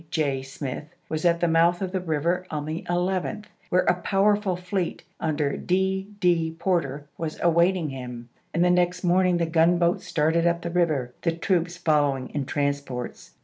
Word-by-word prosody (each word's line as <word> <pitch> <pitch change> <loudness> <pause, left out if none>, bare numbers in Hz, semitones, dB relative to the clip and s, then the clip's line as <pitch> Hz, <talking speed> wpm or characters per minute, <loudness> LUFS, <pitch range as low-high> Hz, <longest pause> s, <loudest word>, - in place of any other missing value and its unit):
J. 140 -4 0
Smith, 135 +3 -7
was 155 +2 -2
at 170 -1 +3
the 175 - +3
mouth 170 +2 +3
of 190 -2 -3
the 190 - -1
river 170 +2 -1
on 150 -2 -3
the 155 +2 -3
11th, 185 +4 -1 0.2
where 180 - +3
a 180 0 +1
powerful 200 0 +2
fleet, 180 0 -3 0.2
under 150 -3 0
D. 190 +1 0
D. 165 -4 +2
Porter, 165 -6 -1
was 160 -2 -4
awaiting 170 0 +3
him, 125 -3 -7 0.2
and 170 +2 +2
the 180 - +4
next 180 0 +1
morning 180 0 +3
the 170 - +1
gunboats 170 +1 +2
started 165 +2 +2
up 170 0 0
the 170 - -3
river, 155 -8 +1
the 165 - +1
troops 175 0 0
following 145 -6 +1
in 145 -2 -3
transports. 140 -4 -3
170 Hz, 170 wpm, -25 LUFS, 150-180 Hz, 0.2 s, the